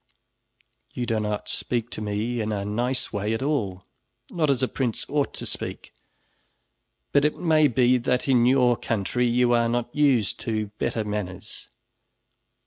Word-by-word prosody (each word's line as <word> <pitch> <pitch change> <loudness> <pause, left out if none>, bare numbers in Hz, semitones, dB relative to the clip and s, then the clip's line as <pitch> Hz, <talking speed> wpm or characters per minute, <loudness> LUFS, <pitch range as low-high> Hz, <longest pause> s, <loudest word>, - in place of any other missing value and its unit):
"You 125 - -2
do 115 -2 0
not 105 -1 -3
speak 120 -1 0
to - - -6
me 105 +3 -2
in 110 0 -2
a 100 -1 -2
nice 125 +5 -1
way 105 +2 -1
at 115 - -3
all, 105 -10 -1 0.5
not 160 -4 0
as 135 -2 +1
a - - +3
prince 125 -4 -2
ought 145 -1 0
to - - -5
speak, - - -6 1.2
but 140 - +4
it 150 - +1
may 155 -3 +4
be 125 0 +3
that 125 +2 0
in 125 -3 +4
your 125 -2 +4
country 115 +3 -1
you 120 0 +3
are 120 -1 +3
not 120 0 -2
used 135 -9 +2
to 110 -3 -2
better 110 - -1
manners. 105 -3 -5
120 Hz, 160 wpm, -25 LUFS, 105-130 Hz, 1.2 s, but